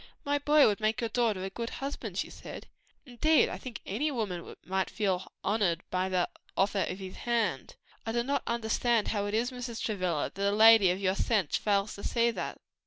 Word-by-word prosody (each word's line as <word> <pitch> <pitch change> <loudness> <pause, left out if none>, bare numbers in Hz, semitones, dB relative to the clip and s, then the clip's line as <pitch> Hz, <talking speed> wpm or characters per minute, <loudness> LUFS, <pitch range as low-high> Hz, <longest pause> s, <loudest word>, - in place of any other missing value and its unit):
"My 290 0 +1
boy 295 0 +5
would 205 -2 +2
make 215 0 0
your 230 -2 -2
daughter 220 -5 +1
a 190 - -4
good 230 +3 -4
husband," 275 +1 -5
she - - -2
said, - - -9 0.4
"and 250 - -13
indeed, 315 -1 +5
I - - -6
think 250 -3 -8
any 250 +11 -1
woman 210 - -4
might 190 +1 -1
feel 195 -4 0
highly 190 - -11 0.2
honored 190 -5 +1
by 185 +1 0
the 185 -2 +1 0.3
offer 200 +1 +2
of 185 - -4
his 190 -1 -8
hand. 235 -2 -1 0.3
I 225 - -3
do 235 +1 0
not 280 +2 0
understand 235 0 +1
how 205 -2 -1
it 205 - -2
is, 240 +3 0
Mrs. 245 -2 -6
Travilla, 185 -8 -1
that 200 +1 0
a 200 - 0
lady 220 -3 +8
of 180 +2 0
your 190 -1 +1
sense 200 - 0
fails 200 0 +1
to 200 - -9
see 235 0 +2
that." - - -5
215 Hz, 215 wpm, -30 LUFS, 190-235 Hz, 0.4 s, lady